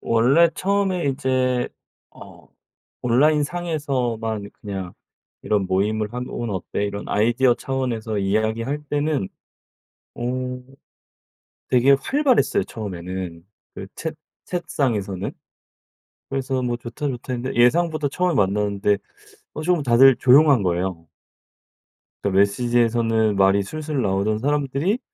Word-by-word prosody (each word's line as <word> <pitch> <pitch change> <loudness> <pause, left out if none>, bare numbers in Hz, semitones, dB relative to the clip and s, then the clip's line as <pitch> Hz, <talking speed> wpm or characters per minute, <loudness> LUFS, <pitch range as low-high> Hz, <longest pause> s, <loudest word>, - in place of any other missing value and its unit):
원래 130 +9 +4
처음에 195 -2 0
이제 130 -2 0 0.4
어 - - -15 0.5
온라인상에서만 135 -6 0
그냥 95 -4 -5 0.5
이런 105 -3 0
모임을 105 +3 0
하면 125 +1 -5
"오늘 115 -4 -3
어때?" 95 +2 -3
이런 100 0 -4
아이디어 120 +4 +3
차원에서 120 -6 -3
이야기할 110 +8 -1
때는 145 -8 -1 0.9
어 - - -7 1.5
되게 130 +2 +4
활발했어요 250 - +2
처음에는 90 -4 -6 0.3
그 95 - -7
챗 160 0 -5 0.3
챗상에서는. 115 - -2 1.0
그래서 135 -1 -2
뭐 120 -1 -1
"좋다, 120 +5 -5
좋다." 125 -1 -4
했는데 125 +2 -4
예상보다 155 +3 +3
처음에 180 +2 0
만났는데 100 0 +1 0.6
어 155 - -5
좀 170 -2 +1
다들 130 +2 +6
조용한 135 -2 +5
거예요. 90 -1 -2 1.2
그 - - 0
메시지에서는 115 +2 +2
말이 95 +1 +4
술술 155 +4 -3
나오던 100 +2 0
사람들이 145 - 0
120 Hz, 270 characters per minute, -22 LUFS, 105-145 Hz, 1.5 s, 다들